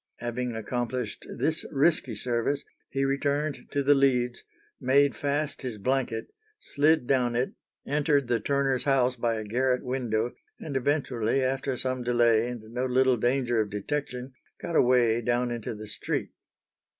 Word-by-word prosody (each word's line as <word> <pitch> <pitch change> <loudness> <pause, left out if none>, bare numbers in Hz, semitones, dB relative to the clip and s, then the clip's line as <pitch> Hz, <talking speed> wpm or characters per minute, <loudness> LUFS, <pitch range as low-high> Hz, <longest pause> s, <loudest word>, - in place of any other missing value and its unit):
Having 120 0 -3
accomplished 120 0 -3
this 155 +6 0
risky 140 -5 +2
service, 120 +5 -1 0.2
he 135 0 0
returned 140 +2 -1
to 140 - 0
the 145 +1 +6
leads, 125 -3 +2 0.4
made 140 +2 +3
fast 145 +1 -2
his 125 -5 -4
blanket, 125 0 -1 0.2
slid 155 - +2
down 125 -2 +2
it, 125 +2 0 0.3
entered 145 -1 +2
the 120 -1 +1
turner's 135 0 0
house 130 -2 +3
by 115 -1 0
a 110 - -3
garret 125 +4 0
window, 120 -3 -1 0.3
and 150 -4 -6
eventually, 130 -3 +1
after 130 0 -1
some 130 0 -1
delay 120 -2 +3
and 120 -3 -6
no 125 +1 0
little 130 0 +3
danger 120 -1 +1
of 105 - -3
detection, 125 +4 -4 0.3
got 170 - -4
away 120 -3 +4
down 120 +1 0
into 115 -1 -4
the 105 0 -8
street. 105 - -3
125 Hz, 150 wpm, -27 LUFS, 120-140 Hz, 0.4 s, the